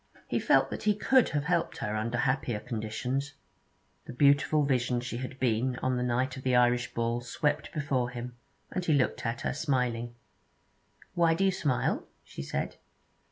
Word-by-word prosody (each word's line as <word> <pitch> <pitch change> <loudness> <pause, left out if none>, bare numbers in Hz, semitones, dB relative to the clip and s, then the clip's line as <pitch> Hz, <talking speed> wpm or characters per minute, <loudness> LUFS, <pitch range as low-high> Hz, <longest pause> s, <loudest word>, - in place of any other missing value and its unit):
He - - 0
felt - - +3
that - - -4
he 210 -1 +2
could 255 +4 +4
have 145 -1 -1
helped 170 +1 0
her 105 - -3
under 115 +3 -1
happier 130 -3 0
conditions. 125 +5 -3 0.7
The - - -8
beautiful 145 +3 +4
vision 125 -3 +1
she 120 -1 -5
had 130 +1 -6
been 125 +1 +1
on 130 0 -1
the 125 - -1
night 125 +2 0
of 130 - -7
the 130 -1 +1
Irish 120 0 +2
Ball 115 +1 0
swept 150 +5 -1
before 135 -5 -1
him, 125 0 -7 0.4
and 185 - -2
he 165 - +2
looked 125 -3 +1
at 115 +1 -3
her, - - -1
smiling. 125 -5 -1 1.0
'Why 165 -1 +3
do 195 +3 +1
you 190 - +4
smile?' 145 -8 0 0.2
she - - -8
said. 70 - -3
125 Hz, 175 wpm, -29 LUFS, 120-145 Hz, 1.0 s, could